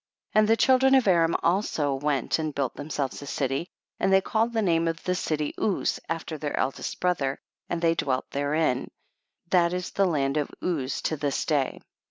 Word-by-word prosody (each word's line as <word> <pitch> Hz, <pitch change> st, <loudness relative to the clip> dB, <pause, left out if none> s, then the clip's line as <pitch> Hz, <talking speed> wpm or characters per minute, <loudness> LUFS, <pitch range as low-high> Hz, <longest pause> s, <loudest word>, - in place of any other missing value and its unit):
34. -, -, +5 dB
And 215 Hz, -, +2 dB
the 225 Hz, -, +5 dB
children 265 Hz, +1 st, +5 dB
of 260 Hz, -5 st, +3 dB
Aram 170 Hz, -3 st, +4 dB
also 165 Hz, -6 st, +1 dB
went 140 Hz, +1 st, 0 dB
and 155 Hz, -2 st, -3 dB
built 135 Hz, -4 st, -1 dB
themselves 145 Hz, -2 st, -4 dB
a 145 Hz, -, -8 dB
city, 135 Hz, +4 st, -1 dB, 0.3 s
and 195 Hz, -, +2 dB
they 190 Hz, -, +7 dB
called 225 Hz, +4 st, 0 dB
the 225 Hz, -2 st, 0 dB
name 165 Hz, -3 st, +2 dB
of 165 Hz, 0 st, -3 dB
the 180 Hz, -, 0 dB
city 155 Hz, -4 st, -2 dB
Uz 205 Hz, -4 st, 0 dB
after 165 Hz, -1 st, -4 dB
their 145 Hz, -1 st, -3 dB
eldest 135 Hz, -, -2 dB
brother, 150 Hz, -7 st, 0 dB, 0.3 s
and 170 Hz, -1 st, -2 dB
they 165 Hz, 0 st, +4 dB
dwelt 130 Hz, -5 st, -1 dB
therein; 145 Hz, -2 st, 0 dB, 0.6 s
that 175 Hz, -1 st, +4 dB
is 180 Hz, 0 st, -3 dB
the 195 Hz, -1 st, +2 dB
land 140 Hz, -4 st, 0 dB
of 150 Hz, -, 0 dB
Uz 145 Hz, -7 st, -2 dB
to 155 Hz, -, 0 dB
this 140 Hz, -1 st, -1 dB
day. 145 Hz, -4 st, 0 dB
160 Hz, 195 wpm, -26 LUFS, 145-180 Hz, 0.6 s, they